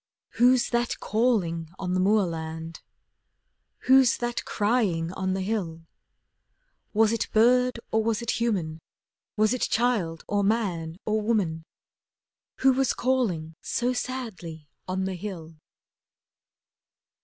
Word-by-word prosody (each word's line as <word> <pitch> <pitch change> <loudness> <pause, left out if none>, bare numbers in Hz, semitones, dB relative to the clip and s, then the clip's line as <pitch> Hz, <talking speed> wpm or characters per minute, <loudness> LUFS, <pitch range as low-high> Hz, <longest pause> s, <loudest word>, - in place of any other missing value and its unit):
Who's 245 +1 +4
that 240 0 0
calling 195 -9 0
on 180 -1 -3
the 185 - +1
moorland? 165 -5 -1 1.0
Who's 260 -1 +5
that 240 0 -3
crying 205 -7 0
on 190 0 -1
the 190 - -2
hill? 175 -6 -3 1.1
Was 220 0 +3
it 230 - -2
bird 250 +2 +4
or 220 0 +2
was 225 -1 0
it 235 - -2
human, 175 -9 -1 0.6
Was 215 +2 +3
it 255 - -3
child, 215 -9 0
or 205 -1 +1
man, 185 -7 -1
or 215 0 0
woman, 190 -8 0 1.0
Who 265 - +7
was 265 -1 +1
calling 215 -12 0
so 245 +1 -1
sadly 195 - -5 0.2
on 185 +1 -1
the 190 - -2
hill? 175 -4 -7
210 Hz, 120 wpm, -26 LUFS, 170-235 Hz, 1.1 s, Who